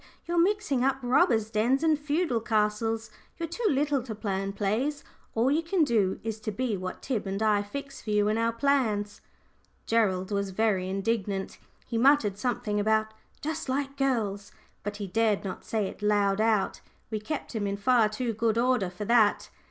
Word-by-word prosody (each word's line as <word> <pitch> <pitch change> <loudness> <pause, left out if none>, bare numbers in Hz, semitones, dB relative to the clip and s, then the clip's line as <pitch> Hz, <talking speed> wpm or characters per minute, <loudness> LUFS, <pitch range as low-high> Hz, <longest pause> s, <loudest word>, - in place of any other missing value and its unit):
"You're 345 0 0
mixing 365 -9 +1
up 270 0 +2
robbers' 230 -3 +3
dens 240 +7 +2
and 315 -1 +4
feudal 295 -3 0
castles. 220 0 0 0.3
You're 335 - -3
too 430 +8 -1
little 285 -2 +1
to 235 -3 -6
plan 195 -2 -2
plays. 225 +9 -1 0.3
All 235 +4 +3
you 310 +3 +2
can 335 +1 +1
do 215 -9 +1
is 220 -1 -4
to 215 0 -4
be 230 +1 -1
what 185 -1 -6
Tib 235 -7 -2
and 195 +1 -2
I 210 -2 +3
fix 275 +7 -7
for - - -8
you 210 0 +3
in 215 - +2
our 230 +1 +1
plans." 230 -5 0 0.6
Gerald 195 -4 +1
was 200 -1 -1
very 190 -2 0
indignant. 195 0 -2 0.3
He 230 - -2
muttered 235 -7 +4
something 230 -3 -1
about 220 +1 +1 0.3
"just 305 -2 -4
like 275 +1 -1
girls," 225 -8 -1 0.3
but 205 +1 -5
he 205 - -4
dared 215 +1 +1
not 190 -2 -6
say 220 -3 -1
it 190 - -7
loud 205 -1 +2
out; 220 -3 +1 0.3
we 215 - -1
kept 290 +7 -5
him 210 -3 -1
in 200 0 -2
far 225 +1 +3
too 230 +2 -2
good 225 +1 0
order 245 -6 +2
for 185 +4 -6
that. 220 -2 +3
220 Hz, 185 wpm, -28 LUFS, 205-260 Hz, 0.6 s, and